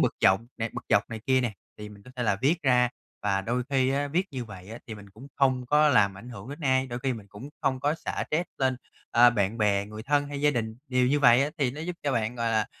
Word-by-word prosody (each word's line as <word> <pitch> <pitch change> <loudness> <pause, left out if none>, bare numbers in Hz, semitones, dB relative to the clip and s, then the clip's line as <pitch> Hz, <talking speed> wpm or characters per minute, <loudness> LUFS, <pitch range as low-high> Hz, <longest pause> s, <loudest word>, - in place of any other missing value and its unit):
bực - - +2
dọc 95 +3 +5 0.3
bực - - -7
dọc - - +2
này 110 -1 -5
kia 130 -1 +4
nè, 120 -4 -1 0.3
thì 105 0 -7
mình 100 -1 -14
có 125 - -14
thể 125 - -2
là 100 -4 +1
viết 165 +5 +2
ra 125 -2 +4 0.3
và 100 -1 +1
đôi 120 +5 -1
khi 130 -1 +2
á, 140 +1 0
viết 175 +6 +1
như 130 -3 -5
vậy 95 -3 -11
á 115 - -7
thì 110 - -6
mình 100 -1 -13
cũng 115 +7 -13
không 130 -2 +2
có 150 +2 +4
làm 100 -7 +3
ảnh 120 - -11
hưởng 120 +1 -9
đến 145 +4 -8
ai, 130 -2 +2
đôi 120 -1 -5
khi 135 -1 +1
mình 110 -4 -8
cũng 105 +8 -10
không 130 -2 0
có 145 +2 +1
xả - - -4
stress 165 +4 0
lên, 130 -1 +1 0.3
ơ, 120 +1 +7
bạn 105 0 -1
bè, 100 -1 +2
người 110 +1 -8
thân 145 +2 +1
hay 140 -1 -5
gia 150 - +4
đình. 110 -4 -3
Điều 125 -1 +2
như 145 +2 +2
vậy 125 0 +6
á 145 - -1
thì 135 -4 +1
nó 150 +4 -8
giúp 175 +1 -4
cho 140 -2 0
bạn, 115 0 -1
gọi 115 -1 0
là, 110 -1 +1
125 Hz, 280 wpm, -27 LUFS, 110-140 Hz, 0.3 s, ơ